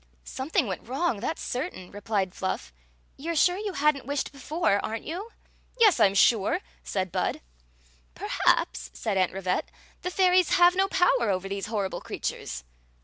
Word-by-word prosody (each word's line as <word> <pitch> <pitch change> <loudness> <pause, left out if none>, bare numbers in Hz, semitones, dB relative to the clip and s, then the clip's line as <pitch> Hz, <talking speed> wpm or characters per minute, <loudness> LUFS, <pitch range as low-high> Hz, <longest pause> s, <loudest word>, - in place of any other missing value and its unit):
" - - -37
Something 285 - -1
went 195 +1 -5
wrong, 265 -2 0
that 285 +9 -2
's - - -7
certain," 250 - -4
replied 200 -2 -2
Fluff. 65 - -4 0.4
"You 330 +5 -3
Ve - - -5
sure 355 +4 +4
you 410 -1 -3
had 300 0 +3
n't 270 -2 -10
wished 285 0 -2
before, 280 - 0
are 220 - -2
nt - - -14
your 360 +7 -5 0.5
"Yes, 430 -6 +6
I - - +7
*m 195 - -4
sure," 225 - +4 0.2
said 185 -2 -2
Bud. - - -1 0.4
" - - -33
Perhaps," 60 +1 +1
said 195 - -2
Aunt 185 -2 +2
Rivette, 185 -1 -2 0.2
" - - -31
the 360 - -2
fairies 365 -1 +3
have 350 0 +6
no 385 +1 +3
power 275 - +3
over 190 0 -1
these 195 0 -4
horrible 205 -4 -2
creatures." - - -5
235 Hz, 190 wpm, -27 LUFS, -, 0.5 s, I